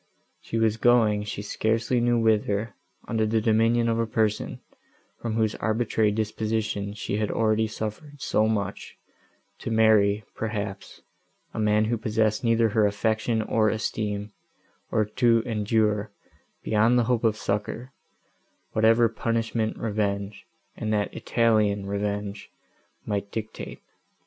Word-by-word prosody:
She 115 - -4
was 110 -1 +2
going 110 -4 +3
she 105 -1 -5
scarcely 115 +3 0
knew 120 0 +2
whither, 110 -1 +1 0.3
under 110 -1 0
the 110 +1 +2
dominion 115 +2 +3
of 115 0 +1
a 115 - 0
person, 110 -1 -1 0.6
from 115 -2 -2
whose 110 -1 +1
arbitrary 110 -1 +1
disposition 110 -1 -2
she 105 - -3
had 105 -1 -1
already 110 0 +1
suffered 110 +8 -6
so 110 -4 +1
much, 100 -3 -3 0.6
to - - -5
marry, 110 -2 +4
perhaps, 105 -3 -5 0.5
a - - -4
man 105 0 +3
who 115 +1 -1
possessed 110 +1 0
neither 115 -1 +3
her 105 0 +3
affection, 110 +2 0
nor 110 -1 +3
esteem; 105 -1 -3 0.6
or 110 - +1
to 115 +1 +2
endure, 105 -1 +1 0.5
beyond 110 +3 +3
the 120 - +4
hope 120 0 0
of 110 -2 +2
succour, 105 +6 -3 0.8
whatever 115 +2 +4
punishment 115 0 -1
revenge, 100 -2 -2 0.3
and 110 - -3
that 105 -1 0
Italian 105 -4 +1
revenge, 100 0 -3 0.6
might 100 -1 -3
dictate. 110 -1 -6
110 Hz, 130 wpm, -26 LUFS, 105-115 Hz, 0.8 s, marry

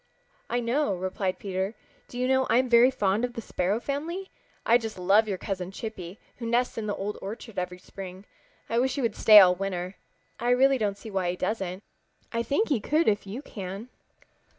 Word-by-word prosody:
"I 245 - 0
know," 235 -2 +1
replied 185 +1 -2
Peter. 190 +2 -3 0.3
"Do 245 - -9
you 250 +1 0
know 265 0 +2
I'm 255 +2 +3
very 240 +1 +6
fond 210 -4 0
of 245 -1 -1
the 235 - -5
Sparrow 195 +1 -1
family. 325 +9 -4 0.3
I 235 +2 +5
just 225 -3 -6
love 200 +5 +4
your 195 -3 -2
cousin 185 -2 -4
Chippy, 195 -2 -7 0.2
who 235 - -5
nests 240 +2 +1
in 220 -2 -4
the 205 - -1
Old 205 +2 -4
Orchard 210 0 -6
every 180 0 -4
spring. 190 +1 -10 0.4
I 230 - +1
wish 260 +1 +1
he 280 - -1
would 230 - 0
stay 215 -1 +9
all 180 -2 +7
winter. 185 0 -4 0.4
I 240 - 0
really 265 +2 +4
don't 205 -2 -1
see 220 +1 -9
why 190 -2 0
he 175 - -1
doesn't. 190 -1 -3 0.5
I 230 - -1
should 235 - -2
think 425 +11 +1
he 280 -6 +2
could 310 +10 +1
if 205 -1 +1
you 230 +9 -6
can." 200 0 -7
215 Hz, 205 wpm, -27 LUFS, 190-245 Hz, 0.5 s, stay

